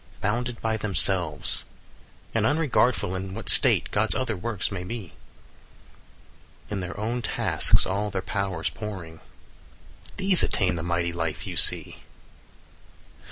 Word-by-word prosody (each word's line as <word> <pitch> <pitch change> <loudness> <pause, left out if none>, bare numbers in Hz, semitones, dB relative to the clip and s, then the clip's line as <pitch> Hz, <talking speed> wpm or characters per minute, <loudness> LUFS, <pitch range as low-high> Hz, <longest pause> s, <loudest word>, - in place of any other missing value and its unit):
"Bounded 120 +3 -3
by 110 -1 -2
themselves, 95 -6 +2 0.7
and 115 - 0
unregardful 135 - 0
25 95 - -5
In - - -9
what 110 -4 -3
state - - +5
God's 105 -2 0
other 125 -4 -3
works 105 +2 -4
may 90 -3 -6
be, 95 -3 -8 1.6
In 100 - -3
their 95 +2 -7
own 115 +3 -3
tasks - - +1
all 100 +2 -3
their 95 -2 -5
powers 95 -5 -4
pouring, 95 -7 -9 1.0
These 190 -1 +8
attain 95 -4 0
the 85 - -5
mighty 85 0 -3
life 80 -2 -5
you - - -7
see." - - +3
100 Hz, 130 wpm, -24 LUFS, 90-115 Hz, 1.6 s, These